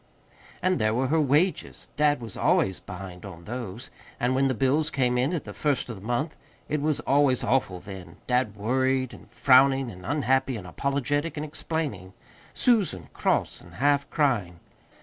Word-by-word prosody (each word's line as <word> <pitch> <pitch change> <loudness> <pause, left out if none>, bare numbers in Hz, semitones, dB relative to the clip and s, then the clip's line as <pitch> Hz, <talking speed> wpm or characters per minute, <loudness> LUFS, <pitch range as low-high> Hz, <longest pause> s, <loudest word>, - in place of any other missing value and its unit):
And 185 0 +2
there 110 +1 +1
were 130 +1 0
her 160 +1 +3
wages 150 +6 0
dad 145 -3 +2
was 115 -4 -7
always 95 -1 +2
behind 90 -2 -9
on 85 -4 -10
those. 115 +1 -6 0.3
And 125 +1 +1
when 135 +1 +3
the 130 - 0
bills 135 +6 +2
came 125 -2 +1
in 125 +5 +1
at 170 -4 -2
the - - -8
first 140 -5 -1
of 115 - -5
the 95 - -12
month, 120 +9 -2 0.3
it 150 0 -1
was 150 -1 0
always 140 -3 +3
awful 110 -8 +1
then: 90 -3 -10
dad 125 -4 +1
worried 130 +4 0
and - - -14
frowning 135 -1 +4
and 90 -2 -12
unhappy 130 - +1
and 100 - -9
apologetic 140 - -1
and 150 - -3
explaining; 145 - -4 0.4
Susan 190 - +1
cross - - 0
and - - -15
half 140 +1 +2
crying. 110 - 0
130 Hz, 170 wpm, -26 LUFS, 105-145 Hz, 0.4 s, frowning